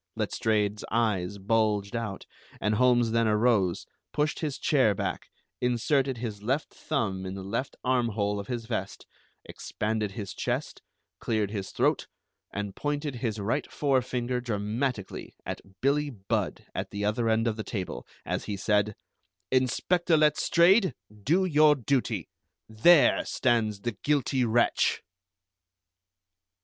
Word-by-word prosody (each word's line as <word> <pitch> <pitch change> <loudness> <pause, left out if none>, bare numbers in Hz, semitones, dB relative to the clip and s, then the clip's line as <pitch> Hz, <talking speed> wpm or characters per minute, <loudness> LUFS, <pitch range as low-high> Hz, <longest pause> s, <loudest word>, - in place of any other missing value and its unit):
Letstrayed's 105 -1 0
eyes 100 -5 0
bulged 105 0 +1
out, 110 -5 -4 0.3
and 105 +1 +1
Holmes 120 0 +3
then 115 0 +2
arose, 105 -4 +2 0.3
pushed 150 +1 0
his 150 -4 -2
chair 130 -9 +3
back, 95 -2 -3 0.3
inserted 130 +2 +1
his 110 -3 -5
left 135 +8 -1
thumb 105 -11 -2
in 95 0 -5
the 95 - -6
left 115 +8 -3
armhole 115 -5 +1
of 100 - -6
his 120 -2 -4
vest, 110 -5 -4 0.4
expanded 105 -1 -3
his 105 -5 -6
chest, - - -3 0.4
cleared 110 -3 -1
his 100 -3 -4
throat, - - +1 0.4
and 100 -1 -4
pointed 145 -2 -2
his 115 -3 -2
right 110 +8 -2
fore 135 -3 +2
finger 125 0 -2
dramatically 110 0 -3
at - - -4 0.2
Billie 145 +2 +2
Budd 100 -7 -3
at - - -3
the 100 0 -3
other 115 +2 +1
end 110 +1 +2
of 110 - 0
the 110 - -4
table, 95 -4 -5 0.2
as - - -2
he 100 - -3
said: 105 +1 +1 0.6
"Inspector 160 +7 +2
Letstrayed, 170 - +4 0.2
do 155 - +1
your 155 -3 +5
duty! 120 - -1 0.4
There 140 +9 +5
stands 110 -5 +1
the 120 - -1
guilty 130 +3 0
wretch!" 120 +1 +2
115 Hz, 135 wpm, -28 LUFS, 105-130 Hz, 0.6 s, your